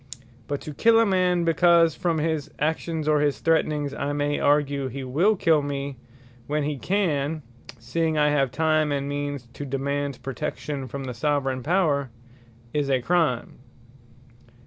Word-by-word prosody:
But 145 -1 -3
to 150 - -7
kill 230 +9 +4
a 230 - +5
man, 180 -3 +2
because 165 0 +4
from 170 0 -1
his 155 -2 -1
actions, 160 +1 -2
or 150 -1 +4
his 145 -1 +1
threatnings, 150 -3 +1
I 140 0 -2
may 145 0 0
argue 145 -1 +2
he 135 +2 -6
will 165 +12 +2
kill 165 -5 +3
me 140 -1 -4 0.5
when 150 0 0
he 145 -1 -2
can, 155 - 0 0.3
(seeing 155 +7 -1
I 150 0 +4
have 135 -3 +2
time, 155 +1 +1
and 140 -1 -1
means 145 -2 -3
to - - -7
demand 140 0 -3
protection, 140 0 -4
from 135 +3 -6
the 130 -1 -5
Soveraign 135 0 -1
Power,) 150 -4 +1 0.6
is 145 -2 0
a 130 -1 +3
Crime. 150 -5 0
145 Hz, 155 wpm, -25 LUFS, 140-160 Hz, 0.6 s, a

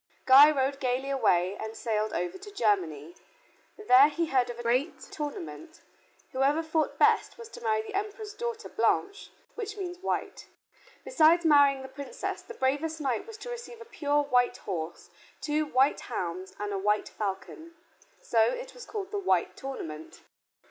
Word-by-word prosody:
Guy 275 +3 +9
rode 275 -2 0
gaily 260 +1 -1
away 190 -8 +2
and 220 0 -6
sailed 215 -2 -1
over 175 +1 -3
to 405 +2 -10
Germany. 175 - 0 0.6
There 285 -9 +6
he 335 +2 -1
heard 260 -6 +1
of 240 - -6
a 240 - -7
great 250 +7 0
tournament. 295 - -7 0.5
Whoever 280 +5 +1
fought 320 -1 -1
best - - +3
was 465 -1 -10
to 480 - -11
marry 440 -2 0
the 430 -2 -9
Emperor's 415 +1 -4
daughter 470 -1 -5
Blanche, 405 -2 0 0.2
which 430 -2 -6
means 360 -2 -5
white. 380 - -3 0.6
Besides 340 -8 +4
marrying 285 -3 +5
the - - -7
Princess, 280 - -6
the 465 - -11
bravest 300 +3 -1
knight 265 - -2
was 450 -1 -9
to 485 +3 -8
receive 475 0 -8
a 460 - -10
pure 295 -10 0
white 250 -3 +2
horse, 170 -4 -6 0.3
two 300 0 -1
white 270 0 +3
hounds, 185 +1 -5
and 205 0 -3
a 195 - -2
white 210 +2 +1
falcon. 215 - -6 0.4
So 230 - 0
it - - 0
was - - -11
called 400 -3 -5
the 410 - -2
White 385 - +1
Tournament. 160 - -8
285 Hz, 165 wpm, -28 LUFS, -, 0.6 s, Guy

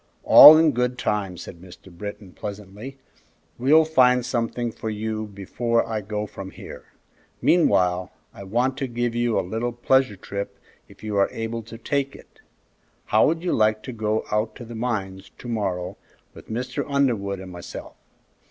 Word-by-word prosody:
"All 155 +1 +11
in 160 -1 +4
good 125 0 -1
time," 100 -6 -2
said 85 0 -10
Mr. 90 0 -15
Britton, 100 0 -8
pleasantly. 105 +6 -8 0.6
"We'll 155 +6 +5
find 125 -5 +4
something 120 -1 -2
for 110 - -6
you 110 0 -3
before 115 +4 -1
I 110 -2 -2
go 105 +1 -4
from 95 -2 -9
here. - - -11 0.5
Meanwhile, 90 - +2 0.2
I 100 - -10
want 125 +6 0
to 135 - -2
give 120 -1 -2
you 120 -1 +1
a - - -2
little 115 +5 -2
pleasure 130 -1 +2
trip 100 +1 -6 0.3
if - - -18
you 105 -1 -3
are 100 - +3
able 115 +1 -4
to 115 +1 -11
take 140 +3 -2
it. - - -18 0.6
How 110 - +4
would 165 +2 -1
you 180 - 0
like 110 0 +2
to 130 - -6
go 110 -1 -1
out 105 +1 -1
to 120 - -9
the 120 - -9
mines 105 -5 -4
to - - -10
morrow 95 -6 -3 0.4
with - - -14
Mr. 125 +3 -3
Underwood 120 -9 0
and 95 -1 -9
myself? 90 -1 -9
110 Hz, 170 wpm, -23 LUFS, 100-125 Hz, 0.6 s, All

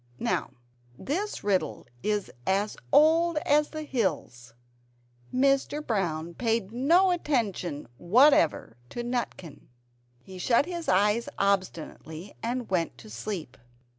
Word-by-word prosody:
Now - - -1 0.5
this 390 +9 -3
riddle 195 -3 0 0.2
is 210 -1 -1 0.2
as 200 +2 +1 0.2
old 325 +2 +5
as 300 +1 +3
the 310 -1 -6
hills; 150 - -3 0.8
Mr. 275 +3 +1
Brown 170 -6 -1
paid 225 -1 -1
no 335 +10 +4
attention 215 - -1
whatever 175 - +4
to 240 - -5
Nutkin. 240 - -4 0.6
He 185 +4 -10
shut 235 +8 +3
his 345 -1 -4
eyes 210 +5 +2
obstinately 185 -2 -2
and 245 +1 -2
went 170 -9 -1
to 110 - -13
sleep. 155 - -6
215 Hz, 110 wpm, -27 LUFS, 180-280 Hz, 0.8 s, old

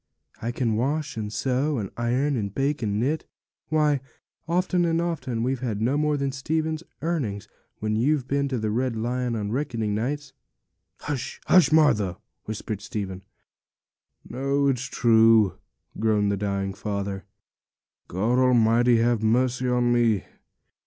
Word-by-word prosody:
I 115 - -2
can 120 -3 0
wash, 145 +4 -1
and 105 -2 -4
sew, 130 +8 0
and 100 -4 -4
iron, 125 +5 0
and 100 -4 -2
bake, 140 +5 -1
and 105 -2 -1
knit. 145 +7 -1 0.4
Why, 150 -2 +2 0.5
often 180 +1 +1
and 165 -1 +1
often 150 -9 -2
we've 130 +1 0
had 115 -5 -3
no 120 +6 +1
more 150 0 +1
than 140 -1 -1
Stephen's 155 +3 -2 0.2
earnings, 135 -13 -2 0.3
when 110 0 -1
you've 130 +3 +1
been 140 0 0
to 130 -2 -2
the 110 -2 -1
Red 125 +1 0
Lion 120 +2 -1
on 105 -2 -3
reckoning 115 -5 -1
nights.' 135 +6 -3 0.7
'Hush, 140 -5 -4
hush, 180 -3 +5
Martha!' 105 - +3 0.3
whispered 110 -1 -5
Stephen. 100 -4 -5 1.1
'No, 140 +2 0
it's 130 -1 -1
true,' 115 -4 +4 0.4
groaned 105 -2 +2
the - - +1
dying 100 -1 -2
father; 100 -1 -4 0.8
'God 110 +8 +1
Almighty, 120 -1 +4
have 115 -1 +2
mercy 125 +3 +1
on 120 -1 +2
me! 115 -5 +2
120 Hz, 145 wpm, -25 LUFS, 110-140 Hz, 1.1 s, hush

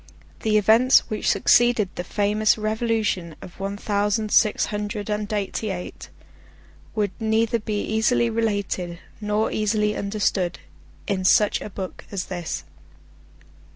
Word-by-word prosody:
The 215 -1 +2
events 225 +5 +5
which 215 - 0
succeeded 240 -5 +4
the 180 - -4
famous 210 +3 +1
Revolution 215 -6 -1
of 185 -1 -12
one 195 +1 -3
thousand 210 +1 0
six 215 -2 +4
hundred 210 0 -3
and 210 0 -2
eighty 205 +1 -2
eight, 180 -2 -6 0.9
would 205 -3 0
neither 225 +1 +1
be 210 -1 -2
easily 220 +2 +2
related 205 -6 -2 0.2
nor 210 +1 0
easily 210 0 0
understood 200 -3 -1 0.5
in 195 -3 -1
such 205 +2 +4
a - - -6
book 190 -1 -7
as 195 -2 -3
this. 175 - -4
210 Hz, 125 wpm, -23 LUFS, 200-220 Hz, 0.9 s, events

